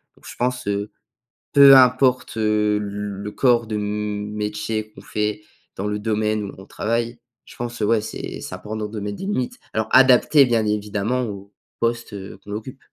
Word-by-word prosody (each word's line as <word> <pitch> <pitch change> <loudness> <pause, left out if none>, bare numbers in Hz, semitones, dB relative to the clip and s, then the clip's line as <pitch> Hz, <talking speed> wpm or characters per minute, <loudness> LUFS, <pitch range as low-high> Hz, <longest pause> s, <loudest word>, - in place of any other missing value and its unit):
Donc, - - -22
je - - -9
pense, 125 -1 -1
heu, 100 +1 -2 0.6
peu 140 -1 +9
importe, 125 -1 +4
heu, 105 -1 +2
le 105 0 -5
corps 120 -1 +3
de 110 -1 -3
m 105 0 -3
métier 105 +1 -3
qu'on - - -13
fait, 105 0 -2 0.3
dans 100 - -3
le 105 0 -1
domaine 110 0 0
où 100 - -7
on 95 - -12
travaille, 115 +3 -2 0.3
je - - -15
pense, 120 0 -5
ouais, 110 +1 +3
c'est - - -6
c'est - - -6
important 105 +3 -5
de 105 0 -6
mettre 100 0 -4
des - - -6
limites. 130 -12 -2
Alors 110 0 -1
adaptées, 130 +3 +6
bien 115 -3 +1
évidemment, 105 +3 -1
au 100 -4 -6 0.3
poste, 115 0 -1
heu, 95 -1 -8
qu'on 105 - -8
occupe. 110 +5 -6
105 Hz, 180 wpm, -22 LUFS, 105-120 Hz, 0.6 s, peu